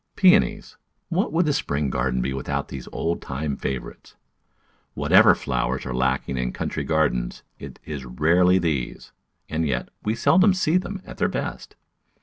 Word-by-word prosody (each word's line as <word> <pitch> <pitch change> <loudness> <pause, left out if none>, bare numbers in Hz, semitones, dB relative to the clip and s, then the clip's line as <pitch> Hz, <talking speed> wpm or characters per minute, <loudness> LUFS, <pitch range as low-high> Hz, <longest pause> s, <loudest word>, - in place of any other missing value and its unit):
Peonies 195 +2 +3 0.2
— - - -50
what 180 0 0
would 165 +3 +2
the 150 - +2
spring 70 - -1
garden 65 0 0
be 65 - -2
with 65 -1 -6
out - - -2
these 65 -2 -7
old 85 +1 -2
time 70 +1 -3
favourites? 65 -1 -6 0.8
Whatever - - +6
flowers 65 -3 -2
are 65 - -4
lacking 65 +1 0
in 60 -1 -2
country - - -3
gardens, 75 -7 0 0.2
it - - -9
is 75 -4 -6
rarely 85 +9 +3
these; 80 -8 -2 0.4
and 80 0 -1
yet, 60 -3 -2
we 110 +1 -1
seldom 185 - +4
see 180 -2 +2
them 190 +1 -5
at - - -11
their - - +2
best. - - -5
75 Hz, 165 wpm, -24 LUFS, -, 0.8 s, Whatever